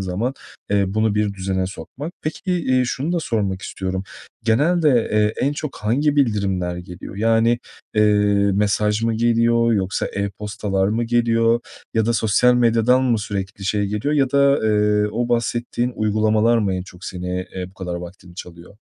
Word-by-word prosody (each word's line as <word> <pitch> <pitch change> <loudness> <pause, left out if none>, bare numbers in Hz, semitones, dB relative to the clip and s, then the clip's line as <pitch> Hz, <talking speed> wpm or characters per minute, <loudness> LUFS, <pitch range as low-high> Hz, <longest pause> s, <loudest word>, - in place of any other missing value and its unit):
zaman, 95 +8 -2 0.4
eee, 100 -1 +3
bunu 110 +2 +1
bir 105 -1 0
düzene 95 -1 -2
sokmak. 120 - -8
Peki, 160 +4 -3
eee, 130 -8 +1
şunu 135 +6 -2
da 175 - 0
sormak 100 -8 -2
istiyorum. 95 0 -4 0.4
Genelde, 155 +9 +3 0.2
eee, 105 0 +3
en 140 - +1
çok 145 -1 -5
hangi 140 +8 0
bildirimler 100 -9 0
geliyor? 90 +2 -9
Yani, 115 +2 +2 0.4
eee, 105 - +4 0.5
mesaj 105 +1 +1
mı 115 0 +1
geliyor 115 0 +2
yoksa, 95 -3 -1
e-postalar 100 -1 -2
mı 115 +3 0
geliyor 115 0 +2 0.3
ya 110 -1 +2
da 115 - +2
sosyal 115 +3 +3
medyadan 120 +1 +3
mı 120 -3 +2
sürekli 100 -1 -5
şey 105 +1 0
geliyor 105 +9 -1
ya 135 -3 +2
da, 140 0 +4
eee, 105 -1 +2
o 120 +2 -1
bahsettiğin 120 +1 -1
uygulamalar 110 +2 +2
mı 100 -4 0
en 90 - -3
çok 90 -1 -13
seni, 90 0 -4
eee, 90 -1 -4
bu - - -26
kadar 90 -2 -5
vaktini 90 0 -9
çalıyor? 85 +2 -11
110 Hz, 160 wpm, -21 LUFS, 95-120 Hz, 0.5 s, eee